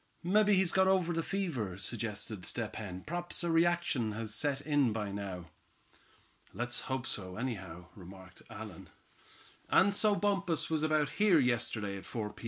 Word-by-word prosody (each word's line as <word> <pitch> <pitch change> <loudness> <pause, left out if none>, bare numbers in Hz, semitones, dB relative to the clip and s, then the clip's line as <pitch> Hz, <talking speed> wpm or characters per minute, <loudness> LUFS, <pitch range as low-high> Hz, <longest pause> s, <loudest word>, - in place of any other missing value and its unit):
"Mebbe 205 +4 +4
he's 190 -3 +4
got 190 0 +4
over 185 -3 +3
the 165 - 0
fever," 155 - -2
suggested 105 -1 -3
Step 110 +3 -4
Hen. 95 -4 -6
"P'raps 175 +2 -3
a 170 - +1
reaction 165 -9 +2
has 110 0 -3
set 140 +4 +1
in 145 -5 +2
by 105 -2 -2
now." 95 -4 -6 1.0
"Let's 120 +1 -1
hope 130 -2 -1
so, 95 -2 -4
anyhow," 95 -8 -5
remarked 95 -1 -12
Allan. - - -9 0.8
"And 200 +1 +5
so 210 0 +4
Bumpus 195 -6 0
was 155 -1 +1
about 155 -2 +2
here 205 -5 +6
yesterday 110 -6 0
at 95 - -10
four 105 -3 -4
P. - - -16
125 Hz, 160 wpm, -33 LUFS, 105-175 Hz, 1.0 s, here